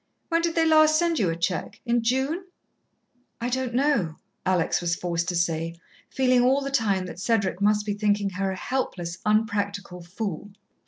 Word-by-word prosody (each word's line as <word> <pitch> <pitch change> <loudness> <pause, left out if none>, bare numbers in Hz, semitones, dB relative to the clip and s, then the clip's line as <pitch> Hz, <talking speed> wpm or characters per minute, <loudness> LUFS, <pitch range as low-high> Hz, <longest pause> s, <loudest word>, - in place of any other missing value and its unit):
When 335 -1 +2
did 335 -1 -1
they 330 -1 +3
last 310 -1 +5
send 335 -1 +1
you 190 - +2
a 165 - -1
cheque? 170 +2 -2
In 240 0 +2
June?" 265 +10 0 0.9
"I 235 +1 -2
don't 255 -1 -2
know," 250 - +1 0.3
Alex 180 -3 +2
was 170 -1 0
forced 170 -1 -2
to 180 - -1
say, 165 -1 -1 0.3
feeling 255 -2 +3
all 265 +3 +3
the 275 0 -4
time 205 -8 +1
that 180 - -8
Cedric 200 -3 0
must 210 0 +3
be 205 - -1
thinking 205 -1 +1
her 195 +1 -1
a - - -4
helpless, 185 -6 -3
unpractical 205 -3 0
fool. 195 +1 -5
210 Hz, 175 wpm, -25 LUFS, 180-260 Hz, 0.9 s, last